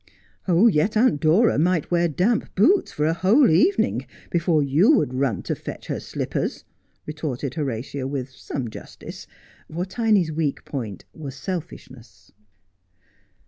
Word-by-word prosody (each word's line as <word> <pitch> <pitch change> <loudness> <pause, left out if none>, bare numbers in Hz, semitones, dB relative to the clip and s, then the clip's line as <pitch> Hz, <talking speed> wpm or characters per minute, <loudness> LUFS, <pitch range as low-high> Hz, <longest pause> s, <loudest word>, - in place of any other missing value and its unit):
' - - -43
Yet 195 +1 +3
Aunt 220 - +3
Dora 170 +5 +4
might 170 0 +1
wear 175 0 +3
damp 185 - 0
boots 340 - +3
for 150 - -1
a 160 - +2
whole 190 - +4
evening 280 - +2 0.2
before 170 -3 +2
you 150 - +4
would 130 - 0
run 130 -7 -1
to - - -2
fetch - - -8
her - - -3
slippers,' - - -4 0.4
retorted 150 -4 -4
Horatia 135 -1 -3
with 135 -2 -4
some 125 0 -5
justice, - - -10 0.4
for 175 +3 -2
Tiny's 200 -4 +1
weak 155 -3 -2
point 110 - -6
was 140 -4 -8
selfishness. 130 - -8
155 Hz, 140 wpm, -23 LUFS, 135-185 Hz, 0.4 s, Dora